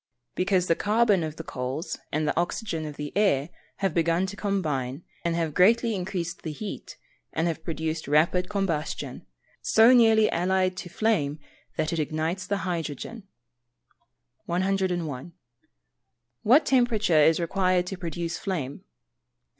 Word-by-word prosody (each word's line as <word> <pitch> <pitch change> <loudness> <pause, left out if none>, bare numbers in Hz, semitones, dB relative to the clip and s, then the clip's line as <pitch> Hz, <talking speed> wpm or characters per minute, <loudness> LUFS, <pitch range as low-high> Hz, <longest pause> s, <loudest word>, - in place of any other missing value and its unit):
_ - - -69 0.3
Because 185 -1 +1
the 165 - +3
carbon 210 -3 +2
of 155 -1 -4
the 165 - -7
coals, 130 +5 -4
and 155 0 0
the - - 0
oxygen 170 -2 -2
of 150 - -7
the 150 0 -6
air, 175 -8 +2 0.4
have 195 - +1
begun 170 +2 +2
to 200 +1 -6
combine, 155 -9 -2 0.2
and 170 -1 0
have 165 -3 -1
greatly 225 +6 +4
increased 180 -3 -3
the 160 - -4
heat, 200 +7 -7 0.4
and 160 - 0
have 160 -1 -3
produced 160 -1 -3
a - - -6
rapid 180 +3 +2
combustion, 190 -7 -3 0.3
so 225 +3 +6
nearly 225 -3 +6
allied 185 +1 +1
to 180 - -6
flame, 175 -8 0 0.4
that 155 - 0
it 165 - -1
ignites 160 +5 -2
the 200 -1 -2
hydrogen. 175 - -4 1.2
101. 175 -5 -1 1.1
_What 260 +9 +5
temperature 220 - +3
is 160 +3 +5
required 185 +1 +1
to 190 - -5
produce 170 -2 -4
flame? 165 -4 -4
175 Hz, 145 wpm, -26 LUFS, 160-195 Hz, 1.2 s, so